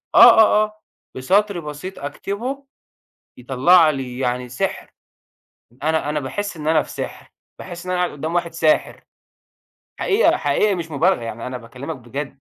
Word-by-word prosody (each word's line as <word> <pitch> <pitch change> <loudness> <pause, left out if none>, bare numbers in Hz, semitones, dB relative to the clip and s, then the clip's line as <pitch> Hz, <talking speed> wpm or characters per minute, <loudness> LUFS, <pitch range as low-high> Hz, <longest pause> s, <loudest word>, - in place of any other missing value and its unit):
آه، - - +9
آه، 215 0 +5
آه، 215 0 -15 0.3
بسطر 195 +8 +1
بسيط 155 +5 -7
أكتبه 200 - -5 0.7
يطلّع 140 +7 +4
لي 130 -4 -4
يعني 125 -1 -2
سحر، 125 - -3 0.9
أنا 160 -1 0
أنا 150 0 -1
باحس 170 +8 -4
إن 150 - -7
أنا 160 -1 +4
في - - -13
سحر، - - -7 0.3
باحس 175 -1 -9
إن 180 - -2
أنا 180 0 0
قدّام 155 +3 -4
واحد 175 -1 -1
ساحر، 160 -2 +1 1.0
حقيقة، 410 +4 +3
حقيقي 210 -2 +1
مش 165 -2 -6
مبالغة 170 +4 +2
يعني، 115 0 -6
أنا 125 0 -5
باكلمك 125 +6 -8
بجد. 135 +2 -7
155 Hz, 150 wpm, -21 LUFS, 130-185 Hz, 1.0 s, آه